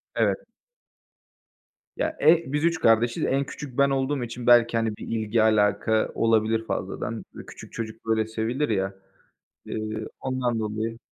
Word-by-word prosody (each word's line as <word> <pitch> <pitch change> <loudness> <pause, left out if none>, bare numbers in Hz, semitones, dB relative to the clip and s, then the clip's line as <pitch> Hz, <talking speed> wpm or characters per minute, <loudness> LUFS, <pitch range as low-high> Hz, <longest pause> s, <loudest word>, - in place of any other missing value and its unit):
Evet. - - 0 1.5
Ya, 315 0 -2
e 170 +1 +6
biz 150 +2 0
3 165 -1 +1
kardeşiz, 115 -2 +3
en 135 +1 +1
küçük 135 -3 -9
ben 140 0 +4
olduğum 135 0 0
için 120 +1 -6
belki, 120 -1 +6
hani, 110 -2 -1
bir - - -9
ilgi 110 0 0
alaka 110 0 +2
olabilir 115 0 +2
fazladan. - - -4
Bö - - -10
küçük - - -12
çocuklar 110 0 -2
hep 110 0 -1
sevilir 115 +6 -1
ya, 95 -2 0 0.7
eee, 110 0 -4
ondan 125 -3 -1
dolayı. 110 +1 -3
115 Hz, 145 wpm, -25 LUFS, 110-130 Hz, 1.5 s, e